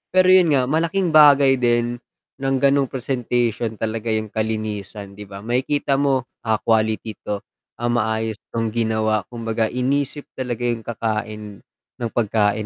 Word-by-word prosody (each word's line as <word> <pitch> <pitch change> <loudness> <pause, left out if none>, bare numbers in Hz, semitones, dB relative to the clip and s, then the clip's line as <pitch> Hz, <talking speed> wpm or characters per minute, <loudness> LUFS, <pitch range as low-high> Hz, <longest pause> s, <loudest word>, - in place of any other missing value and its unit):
Pero 185 0 +6
yun 180 -5 +6
nga 130 - +3
malaking 165 +5 0
bagay 140 -3 +6
din 120 0 +1 0.4
ng 135 0 0
ganong 140 0 +4
presentation 120 -3 -1
talaga 110 +1 -3
yung 110 -1 -1
kalinisan, 110 -2 -4
'di 100 +1 -11
ba? 100 0 -10
Makikita 135 +4 0
mo, 135 -2 +2 0.2
ah, 110 -1 +1
quality 110 -1 0
to, 105 - -2 0.4
ah, 120 0 0
maayos 110 -2 0
tong 115 -1 -2
ginawa, 110 -2 +1
kumbaga 115 -2 -2
inisip 140 +3 -1
talaga 125 -2 -3
yung 120 -1 -1
kakain 110 -1 -3 0.5
ng 115 -2 -4
pagkain 105 -2 +1
120 Hz, 140 wpm, -21 LUFS, 110-135 Hz, 0.5 s, Pero